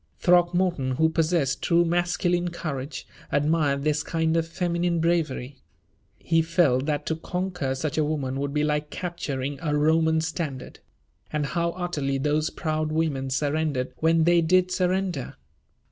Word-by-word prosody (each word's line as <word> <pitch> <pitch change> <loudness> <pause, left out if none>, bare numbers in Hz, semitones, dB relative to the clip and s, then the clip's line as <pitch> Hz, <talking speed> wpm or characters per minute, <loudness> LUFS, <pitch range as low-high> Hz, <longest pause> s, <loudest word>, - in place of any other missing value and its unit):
Throckmorton, 175 -5 +2
who 160 +5 +3
possessed 160 -4 0
true 170 0 +3
masculine 175 +1 +1
courage, 140 -5 -5 0.3
admired 145 -1 +1
this 150 0 +1
kind 160 +1 0
of 165 -1 +1
feminine 170 0 -1
bravery. 155 -6 -1 0.6
He 165 0 +2
felt 160 -5 +2
that 150 -1 -1
to 160 - -1
conquer 180 -4 -3
such 150 +3 -2
a - - +3
woman 140 -3 -2
would 140 0 -2
be 150 +1 0
like 150 0 0
capturing 145 -6 -4
a 150 -3 0
Roman 160 +1 +3
standard. 155 -4 -4 0.5
And 150 -1 -1
how 170 +2 -1
utterly 155 -7 -2
those 150 +3 0
proud 155 -1 -2
women 150 -4 -1
surrendered 145 -1 -1
when 165 0 +3
they 170 +1 +4
did 185 +2 +3
surrender! 180 -5 -1
160 Hz, 145 wpm, -25 LUFS, 145-170 Hz, 0.6 s, they